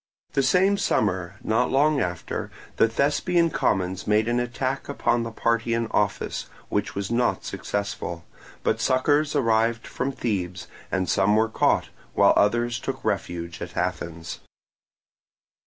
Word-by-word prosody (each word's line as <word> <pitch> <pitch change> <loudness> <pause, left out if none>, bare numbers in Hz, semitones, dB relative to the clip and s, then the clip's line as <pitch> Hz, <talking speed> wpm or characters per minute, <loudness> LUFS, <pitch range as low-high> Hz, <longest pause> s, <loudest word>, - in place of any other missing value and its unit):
The 135 - +3
same 190 +7 +3
summer, 95 -2 0
not 115 +3 +2
long 145 +2 +3
after, 90 -5 -3 0.3
the - - +5
Thespian 165 +7 +2
commons 95 0 0
made 105 +1 +3
an 120 +1 +1
attack 130 +3 -2
upon 120 -4 +1
the 115 - -3
party 115 0 0
in 115 0 0
office, 105 -1 -1 0.2
which 100 -4 -1
was 100 +2 -3
not 120 +1 +1
successful, 100 -4 -4 0.4
but 110 +1 +1
succours 145 +4 +2
arrived 115 -2 +2
from 135 +2 -2
Thebes, 95 -8 -3 0.3
and 95 -1 0
some 100 +2 +3
were 110 +1 +3
caught, - - +2 0.3
while - - +6
others 120 +3 +2
took 130 +1 -5
refuge 85 -3 -3
at 85 -1 -7
Athens. 85 -2 -3
115 Hz, 140 wpm, -25 LUFS, 95-130 Hz, 0.4 s, while